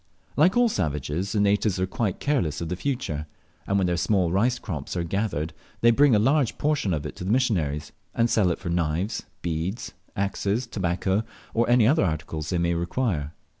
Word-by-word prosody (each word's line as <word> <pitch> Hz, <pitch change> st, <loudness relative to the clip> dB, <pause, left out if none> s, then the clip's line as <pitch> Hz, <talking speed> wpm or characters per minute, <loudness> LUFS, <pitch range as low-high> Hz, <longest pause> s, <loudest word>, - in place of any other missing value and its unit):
Like 180 Hz, +9 st, +4 dB
all 245 Hz, 0 st, +5 dB
savages 80 Hz, -, -2 dB
the 105 Hz, -, +1 dB
natives 100 Hz, -1 st, +2 dB
are 95 Hz, -, +2 dB
quite 95 Hz, 0 st, -2 dB
careless 115 Hz, -, 0 dB
of 85 Hz, -, -4 dB
the 90 Hz, -, -1 dB
future, 90 Hz, -, -3 dB, 0.4 s
and 100 Hz, -, +2 dB
when 95 Hz, -, +2 dB
their 90 Hz, -1 st, 0 dB
small 90 Hz, -2 st, +2 dB
rice 120 Hz, +7 st, +2 dB
crops 85 Hz, -6 st, -5 dB
are 85 Hz, -, 0 dB
gathered 85 Hz, -4 st, -2 dB, 0.3 s
they 120 Hz, -, +6 dB
bring 135 Hz, 0 st, +5 dB
a -, -, +5 dB
large 135 Hz, +4 st, +2 dB
portion 145 Hz, -10 st, +1 dB
of 75 Hz, -4 st, -1 dB
it -, -, -6 dB
to -, -, -6 dB
the 95 Hz, -, -3 dB
missionaries, 85 Hz, -, +1 dB, 0.2 s
and 115 Hz, -, +3 dB
sell 105 Hz, -5 st, +3 dB
it 85 Hz, -, 0 dB
for -, -, -6 dB
knives, 85 Hz, +4 st, -1 dB, 0.2 s
beads, 85 Hz, +6 st, -3 dB, 0.2 s
axes, 100 Hz, +4 st, -1 dB
tobacco, 95 Hz, -1 st, 0 dB, 0.3 s
or 115 Hz, +1 st, +1 dB
any 120 Hz, -2 st, +5 dB
other 140 Hz, +4 st, +4 dB
articles 80 Hz, -2 st, -3 dB
they 90 Hz, -, 0 dB
may 85 Hz, 0 st, +1 dB
require. 85 Hz, -, -1 dB
95 Hz, 195 wpm, -25 LUFS, 85-115 Hz, 0.4 s, they